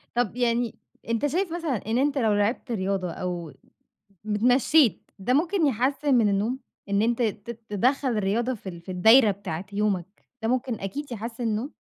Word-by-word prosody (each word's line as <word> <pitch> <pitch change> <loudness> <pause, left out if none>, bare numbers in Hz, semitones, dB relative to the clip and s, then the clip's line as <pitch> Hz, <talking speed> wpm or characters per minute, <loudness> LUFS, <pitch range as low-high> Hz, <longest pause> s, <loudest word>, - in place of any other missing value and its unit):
طَب 240 -3 0
يعني 240 -1 0 0.3
أنت 230 +5 +1
شايف 345 +4 -1
مثلًا 330 -6 -1
إن 225 +2 +1
أنت 280 +2 +1
لو 225 -5 +2
لعبت 205 +5 0
رياضة 190 -4 -1
أو 175 -2 -5 0.7
مت 210 -1 -2
اتمشّيت 250 - +3
ده 220 +6 0
ممكن 330 +3 +2
يحسّن 275 +3 +1
من 225 -4 +4
النوم، 210 +6 0 0.3
إن 200 +1 +2
أنت 235 +2 +1
ت 220 +1 -4
تدخّل 255 +7 +1
الرياضة 225 +6 0
في 200 -4 -8
ال 170 -1 -9
في 185 - -8
الدايرة 220 +5 +6
بتاعة 190 -3 -5
يومك، 200 -2 -2 0.2
ده - - +1
ممكن 250 0 0
أكيد 275 +9 -5
يحسّن 230 +1 -5
النوم؟ 225 +5 -1
230 Hz, 170 wpm, -26 LUFS, 200-260 Hz, 0.7 s, الدايرة